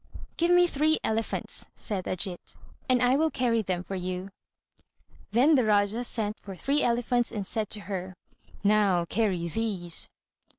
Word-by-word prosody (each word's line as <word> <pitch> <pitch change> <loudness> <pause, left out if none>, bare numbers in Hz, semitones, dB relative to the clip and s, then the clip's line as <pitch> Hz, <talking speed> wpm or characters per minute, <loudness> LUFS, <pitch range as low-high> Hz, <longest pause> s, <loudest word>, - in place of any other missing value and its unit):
"Give 340 +1 +1
me 355 0 +6
three 315 -1 +2
elephants," 220 0 -2
said 195 -4 -2
Ajít, 185 -1 -2 0.3
"and 250 -1 +4
I 250 +1 +4
will 320 +3 +2
carry 245 -5 +1
them 180 -3 -2
for 195 - -7
you." 185 +1 -4 1.0
Then 260 +8 +4
the 270 - +5
Rájá 210 +1 +2
sent 215 -3 -3
for 195 -2 -9
three 280 +9 0
elephants, 240 0 +1
and 205 -3 -4
said 215 +1 -2
to 210 - -2
her, 185 0 -5 0.5
"Now, 200 -4 +3
carry 185 -3 0
these." 185 -3 0
215 Hz, 155 wpm, -28 LUFS, 185-245 Hz, 1.0 s, me